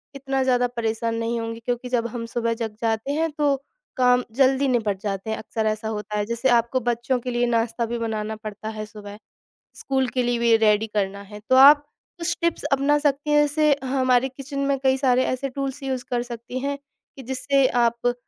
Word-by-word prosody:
इतना 270 Hz, 0 st, -2 dB
ज़्यादा 250 Hz, -1 st, +2 dB
परेशान 230 Hz, -1 st, -2 dB
नहीं 230 Hz, +1 st, -2 dB
होंगे 230 Hz, 0 st, -5 dB
क्योंकि 245 Hz, +2 st, -3 dB
जब 235 Hz, -2 st, 0 dB
हम 235 Hz, 0 st, -5 dB
सुबह 230 Hz, 0 st, -1 dB
जग 225 Hz, -1 st, -4 dB
जाते 225 Hz, +3 st, -1 dB
हैं 325 Hz, +2 st, 0 dB
तो 290 Hz, -2 st, +2 dB, 0.4 s
काम 250 Hz, -1 st, +4 dB
जल्दी 270 Hz, +1 st, +3 dB
निपट 220 Hz, -6 st, 0 dB
जाते 200 Hz, 0 st, -4 dB
हैं, 220 Hz, -, -1 dB
अक्सर 220 Hz, 0 st, -3 dB
ऐसा 215 Hz, +1 st, -2 dB
होता 210 Hz, -1 st, -4 dB
है। 205 Hz, -, 0 dB
जैसे 235 Hz, +4 st, 0 dB
आपको 240 Hz, +1 st, +2 dB
बच्चों 240 Hz, +2 st, 0 dB
के 250 Hz, -, -4 dB
लिए 240 Hz, 0 st, +1 dB
नाश्ता 230 Hz, 0 st, 0 dB
भी 240 Hz, +1 st, -3 dB
बनाना 220 Hz, -1 st, -3 dB
पड़ता 215 Hz, 0 st, -7 dB
है 215 Hz, -, -4 dB
सुबह, 205 Hz, -1 st, -11 dB, 0.6 s
स्कूल 265 Hz, -1 st, -1 dB
के 250 Hz, 0 st, -1 dB
लिए 240 Hz, 0 st, 0 dB
भी 235 Hz, -1 st, +4 dB
रेडी 215 Hz, 0 st, +3 dB
करना 200 Hz, -2 st, -2 dB
है। 210 Hz, +1 st, -11 dB
तो 260 Hz, -, +5 dB
आप 290 Hz, +3 st, +8 dB, 0.4 s
कुछ 340 Hz, 0 st, -1 dB
टिप्स 340 Hz, -1 st, 0 dB
अपना 280 Hz, +2 st, +3 dB
सकती 290 Hz, +1 st, +1 dB
हैं 295 Hz, 0 st, +5 dB
जैसे 295 Hz, 0 st, +3 dB
हमारे 255 Hz, -1 st, +2 dB
किचन 275 Hz, +2 st, -7 dB
में 275 Hz, -, +1 dB
कई 265 Hz, 0 st, +3 dB
सारे 255 Hz, -1 st, +3 dB
ऐसे 265 Hz, +2 st, -2 dB
टूल्स 275 Hz, +1 st, -4 dB
यूज़ 260 Hz, -2 st, -3 dB
कर 240 Hz, -1 st, 0 dB
सकती 240 Hz, +1 st, -6 dB
हैं 280 Hz, +1 st, -2 dB, 0.4 s
कि 265 Hz, -, -9 dB
जिससे 265 Hz, +2 st, +1 dB, 0.2 s
आप 235 Hz, +1 st, +1 dB
245 Hz, 205 wpm, -23 LUFS, 225-265 Hz, 0.6 s, आप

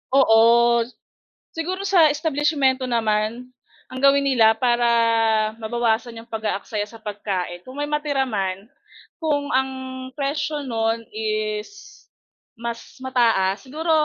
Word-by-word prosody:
Oo. 225 Hz, -5 st, +6 dB, 1.1 s
Siguro 365 Hz, +4 st, -3 dB
sa 355 Hz, -5 st, +6 dB
establisimyento 290 Hz, -3 st, +1 dB
naman, 225 Hz, +1 st, -1 dB, 0.4 s
ang 255 Hz, -, -6 dB
gawin 280 Hz, 0 st, +5 dB
nila 225 Hz, -5 st, +5 dB
para 240 Hz, 0 st, +2 dB, 0.7 s
mabawasan 230 Hz, +1 st, -1 dB
'yong 230 Hz, -, -19 dB
pag-aaksaya 215 Hz, -1 st, -3 dB
sa 225 Hz, +1 st, -14 dB
pagkain, 195 Hz, -4 st, -4 dB
kung 255 Hz, +2 st, -10 dB
may 290 Hz, 0 st, -2 dB
matira 295 Hz, -2 st, 0 dB
man, 195 Hz, -1 st, -3 dB, 0.5 s
kung 290 Hz, -3 st, 0 dB
ang 265 Hz, 0 st, +2 dB, 0.5 s
presyo 295 Hz, +1 st, -2 dB
no'n 225 Hz, -2 st, -1 dB
is 425 Hz, -1 st, -4 dB, 0.5 s
mas 235 Hz, +2 st, -7 dB
mataas, 225 Hz, -7 st, +2 dB
siguro 315 Hz, +5 st, -3 dB
255 Hz, 110 wpm, -22 LUFS, 225-295 Hz, 1.1 s, Oo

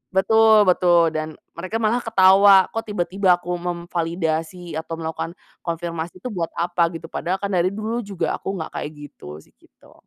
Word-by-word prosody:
betul 220 Hz, +2 st, +5 dB
betul, 175 Hz, -3 st, +4 dB
dan 155 Hz, 0 st, -4 dB, 0.2 s
mereka 185 Hz, +6 st, -6 dB
malah 230 Hz, +2 st, +1 dB
ketawa 195 Hz, -2 st, +6 dB
kok 225 Hz, -, -3 dB
tiba-tiba 190 Hz, -2 st, +1 dB
aku 175 Hz, 0 st, -6 dB
memvalidasi 170 Hz, -1 st, -3 dB
atau 165 Hz, +1 st, -6 dB
melakukan 165 Hz, +2 st, -5 dB, 0.3 s
konfirmasi 170 Hz, +1 st, -5 dB
itu 250 Hz, -, -4 dB
buat 170 Hz, -5 st, -3 dB
apa 175 Hz, 0 st, +1 dB
gitu, 165 Hz, -, -8 dB
padahal 180 Hz, +2 st, -2 dB
kan 200 Hz, 0 st, -3 dB
dari 180 Hz, -1 st, +2 dB
dulu 220 Hz, +3 st, -3 dB
juga 185 Hz, -6 st, -3 dB
aku 195 Hz, -, -4 dB
nggak 160 Hz, -3 st, -6 dB
kayak 150 Hz, -, -4 dB, 0.2 s
gitu 75 Hz, +1 st, -11 dB
sih, -, -, -27 dB
gitu. -, -, -23 dB
175 Hz, 165 wpm, -22 LUFS, 165-200 Hz, 0.3 s, ketawa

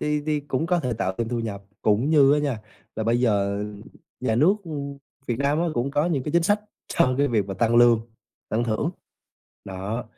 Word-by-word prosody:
thì 150 Hz, 0 st, 0 dB
thì 150 Hz, -1 st, +1 dB
cũng 145 Hz, +2 st, -2 dB
có 175 Hz, 0 st, +2 dB
thể 125 Hz, -6 st, -2 dB
tạo 95 Hz, -4 st, -2 dB
thêm 115 Hz, -1 st, -1 dB
thu 120 Hz, -, -2 dB
nhập. 100 Hz, -3 st, -5 dB, 0.2 s
Cũng 110 Hz, +8 st, +2 dB
như 145 Hz, -3 st, +6 dB
á -, -, +2 dB
nha, 140 Hz, -7 st, -1 dB, 0.4 s
là 110 Hz, -, -2 dB
bây 120 Hz, +2 st, +2 dB
giờ 100 Hz, -3 st, +1 dB, 0.6 s
nhà 115 Hz, -3 st, 0 dB
nước, 160 Hz, -, +5 dB
ư, 165 Hz, -, -8 dB, 0.6 s
Việt 120 Hz, -1 st, -2 dB
Nam 140 Hz, +2 st, +1 dB
á, 175 Hz, -, +1 dB
cũng 125 Hz, +2 st, -1 dB
có 150 Hz, +3 st, +1 dB
những 150 Hz, -7 st, 0 dB
cái 150 Hz, -, -4 dB
chính 170 Hz, 0 st, +4 dB
sách 205 Hz, +4 st, +2 dB, 0.3 s
cho 130 Hz, -, +2 dB
cái 145 Hz, 0 st, +3 dB
việc 105 Hz, -5 st, +1 dB
mà 95 Hz, -, -4 dB
tăng 115 Hz, +4 st, +2 dB
lương, 120 Hz, -2 st, +6 dB, 0.5 s
tăng 115 Hz, +2 st, 0 dB
thưởng. 120 Hz, +8 st, -1 dB, 0.7 s
Đó, 100 Hz, +5 st, -4 dB
120 Hz, 220 wpm, -24 LUFS, 110-150 Hz, 0.7 s, như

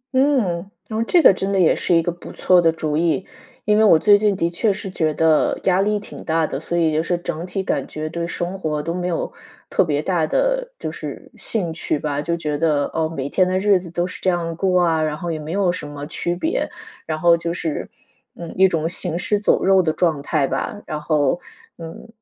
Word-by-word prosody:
嗯， 225 Hz, -10 st, +1 dB, 0.2 s
然 220 Hz, 0 st, -3 dB
后 -, -, +1 dB
这 335 Hz, +8 st, +3 dB
个 -, -, +8 dB
真 195 Hz, +1 st, -3 dB
的 195 Hz, -, +1 dB
也 175 Hz, -, +4 dB
是 175 Hz, -, +1 dB
一 165 Hz, -, +3 dB
个 175 Hz, -, -1 dB
不 175 Hz, -, -11 dB
错 180 Hz, -1 st, +3 dB
的 165 Hz, -1 st, +4 dB
主 155 Hz, -2 st, -3 dB
意。 170 Hz, +3 st, +1 dB, 0.4 s
因 210 Hz, 0 st, +3 dB
为 -, -, +5 dB
我 200 Hz, -7 st, +7 dB
最 205 Hz, +6 st, +5 dB
近 205 Hz, -1 st, +1 dB
的 170 Hz, -, 0 dB
确 175 Hz, +6 st, 0 dB
是 200 Hz, +1 st, -5 dB
觉 160 Hz, -4 st, 0 dB
得， 160 Hz, 0 st, +2 dB
压 190 Hz, 0 st, +3 dB
力 210 Hz, +1 st, +1 dB
挺 -, -, -10 dB
大 160 Hz, 0 st, +1 dB
的， 135 Hz, -, -4 dB
所 170 Hz, +2 st, -3 dB
以 160 Hz, -2 st, +2 dB
就 155 Hz, -, +2 dB
是 175 Hz, +2 st, -1 dB
整 170 Hz, -1 st, -5 dB
体 190 Hz, +1 st, -3 dB
感 -, -, -2 dB
觉 155 Hz, 0 st, -5 dB
对 170 Hz, +1 st, -3 dB
生 175 Hz, +2 st, -4 dB
活 150 Hz, -4 st, -2 dB
都 165 Hz, -, -3 dB
没 180 Hz, 0 st, -3 dB
有 175 Hz, -, -3 dB, 0.4 s
特 -, -, +3 dB
别 150 Hz, -3 st, -1 dB
大 170 Hz, -4 st, 0 dB
的， -, -, 0 dB
就 -, -, -5 dB
是 -, -, -8 dB
兴 180 Hz, -8 st, -3 dB
趣 160 Hz, -, -2 dB
吧， 145 Hz, -1 st, -2 dB
就 170 Hz, +3 st, -2 dB
觉 150 Hz, -3 st, -2 dB
得： 150 Hz, -3 st, +2 dB
“哦， 160 Hz, -1 st, 0 dB
每 140 Hz, -4 st, -4 dB
天 185 Hz, +3 st, +2 dB
的 185 Hz, 0 st, 0 dB
日 200 Hz, 0 st, +3 dB
子 175 Hz, -1 st, -10 dB
都 175 Hz, +1 st, -1 dB
是 185 Hz, -, -8 dB
这 190 Hz, -, +2 dB
样 170 Hz, -2 st, -1 dB
过 185 Hz, +1 st, +2 dB
啊， 165 Hz, -2 st, +2 dB
然 155 Hz, -1 st, -1 dB
后 170 Hz, +1 st, -4 dB
也 160 Hz, -, -3 dB
没 155 Hz, +1 st, -7 dB
有 195 Hz, -2 st, +2 dB
什 175 Hz, -4 st, -6 dB
么 145 Hz, 0 st, -7 dB
区 175 Hz, +2 st, -3 dB
别“。 320 Hz, -, -1 dB, 0.4 s
然 155 Hz, -, -2 dB
后 170 Hz, +1 st, +5 dB
就 170 Hz, 0 st, -3 dB
是 160 Hz, -3 st, -4 dB, 0.5 s
嗯， 170 Hz, -1 st, -8 dB
一 190 Hz, +1 st, +5 dB
种 165 Hz, -3 st, -1 dB
行 175 Hz, -1 st, +4 dB
尸 205 Hz, +3 st, 0 dB
走 205 Hz, -, +2 dB
肉 190 Hz, 0 st, +5 dB
的 165 Hz, -3 st, +1 dB
状 160 Hz, -5 st, 0 dB
态 145 Hz, 0 st, 0 dB
吧。 205 Hz, -, -3 dB
然 155 Hz, -, -4 dB
后， 150 Hz, 0 st, +1 dB, 0.4 s
嗯， 165 Hz, +6 st, -9 dB
170 Hz, 260 characters per minute, -21 LUFS, 160-190 Hz, 0.5 s, 个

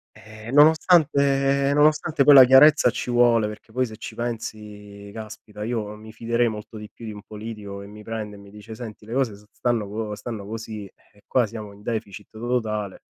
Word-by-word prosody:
Ehm, 110 Hz, +2 st, -11 dB
nonostante 140 Hz, -3 st, +4 dB
nonostante 150 Hz, 0 st, +3 dB
poi 145 Hz, -, +8 dB
la 135 Hz, -2 st, +11 dB
chiarezza 135 Hz, +2 st, +6 dB
ci 125 Hz, +1 st, -4 dB
vuole, 120 Hz, -3 st, +4 dB
perché 105 Hz, +1 st, -10 dB
poi 130 Hz, +2 st, 0 dB
se 110 Hz, -, -9 dB
ci -, -, -8 dB
pensi 105 Hz, -3 st, -7 dB
caspita, 105 Hz, -1 st, -9 dB
io 110 Hz, -2 st, -3 dB
mi 110 Hz, +1 st, -12 dB
fiderei 115 Hz, +1 st, 0 dB
molto 110 Hz, 0 st, -7 dB
di 105 Hz, 0 st, -9 dB
più 115 Hz, -, -12 dB
di 110 Hz, -, -5 dB
un 105 Hz, -1 st, -10 dB
politico 105 Hz, -2 st, -8 dB
che 100 Hz, -, -10 dB
mi 105 Hz, +1 st, -12 dB
prende 110 Hz, -2 st, -6 dB
e -, -, -13 dB
mi 100 Hz, 0 st, -15 dB
dice: 105 Hz, +2 st, -11 dB
"Senti 110 Hz, -2 st, -9 dB
le 115 Hz, -, -8 dB
cose 130 Hz, -5 st, 0 dB
s 105 Hz, +1 st, -18 dB
stanno 120 Hz, -4 st, -1 dB
co 105 Hz, +1 st, -4 dB
stanno 105 Hz, -2 st, -7 dB
così, 110 Hz, -1 st, -6 dB
ehm, 100 Hz, +1 st, -21 dB
qua 125 Hz, -2 st, +2 dB
siamo 105 Hz, -1 st, -8 dB
in 100 Hz, +1 st, -17 dB
deficit 105 Hz, -3 st, -5 dB
to 110 Hz, -, -12 dB
totale." 110 Hz, -4 st, -2 dB
110 Hz, 200 wpm, -23 LUFS, 105-125 Hz, -, la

